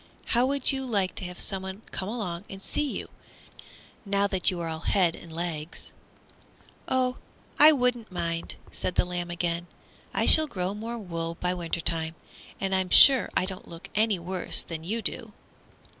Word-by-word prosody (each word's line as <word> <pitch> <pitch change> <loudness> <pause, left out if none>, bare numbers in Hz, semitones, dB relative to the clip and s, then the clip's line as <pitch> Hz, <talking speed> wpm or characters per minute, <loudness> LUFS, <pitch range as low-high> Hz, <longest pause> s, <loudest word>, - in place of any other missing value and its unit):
How 245 +2 +4
would 280 0 +2
you 265 -1 -3
like 200 -7 -1
to 190 - -4
have 180 0 -8
someone 190 +2 -3
come 190 - -1
along 200 -5 -5
and 195 - -9
see 285 +8 -2
you, - - -7 1.0
now 200 -1 0
that 190 -3 +1
you 180 -2 -4
are 170 - -4
all 160 -1 -5
head 175 0 +1
and 170 - -13
legs?" 165 -1 -5 1.0
"Oh, 255 -1 0 0.4
I 305 +1 +10
wouldn't 250 -6 -1
mind," 170 -2 -3 0.2
said 180 - -4
the - - +2
lamb 175 -1 -4
again; 175 0 -3 0.4
"I - - 0
shall 315 -1 +7
grow 185 -6 -3
more 225 +3 -6
wool 170 -5 -5
by 180 0 -1
winter 170 -1 -3
time, 160 -1 +2 0.4
and 195 0 -2
I'm 190 -1 0
sure 265 +5 +9
I - - +2
don't 190 -1 -8
look 170 +1 -12
any 215 -1 +1
worse 180 +1 0
than 160 -1 -7
you 220 +6 -3
do." - - -3
185 Hz, 175 wpm, -26 LUFS, 170-225 Hz, 1.0 s, I